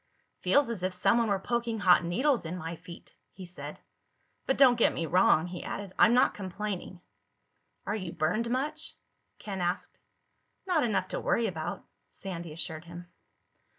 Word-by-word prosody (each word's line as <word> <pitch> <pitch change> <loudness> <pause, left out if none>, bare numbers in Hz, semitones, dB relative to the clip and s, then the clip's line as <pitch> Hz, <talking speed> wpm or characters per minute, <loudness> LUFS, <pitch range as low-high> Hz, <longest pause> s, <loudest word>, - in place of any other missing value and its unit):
"Feels 265 +9 +3
as 215 -6 -4
if 185 0 -1
someone 230 +5 +3
were 200 -2 +2
poking 235 +3 -2
hot 180 -3 +5
needles 250 - +1
in 170 +2 -5
my 165 0 -5
feet," 170 +1 -13 0.2
he 185 - -9
said. 180 +1 -8 0.7
"But 265 - +1
don't 265 -3 +7
get - - +5
me 165 - -1
wrong," 165 -1 +4
he 180 0 -6
added. 200 -2 -5
"I'm 235 - +6
not 250 - +4
complaining." 190 -2 -5 0.8
"Are - - -1
you 185 -5 -4
burned 180 +8 0
much?" 300 +5 -1 0.4
Ken 195 -3 -5
asked. 175 +1 -2 0.7
"Not 355 -5 +2
enough 205 -5 0
to - - -2
worry 235 - +1
about," 175 -4 -4 0.2
Sandy 170 -4 -6
assured 160 +1 -5
him. 175 +1 -10
185 Hz, 160 wpm, -29 LUFS, 175-235 Hz, 0.8 s, don't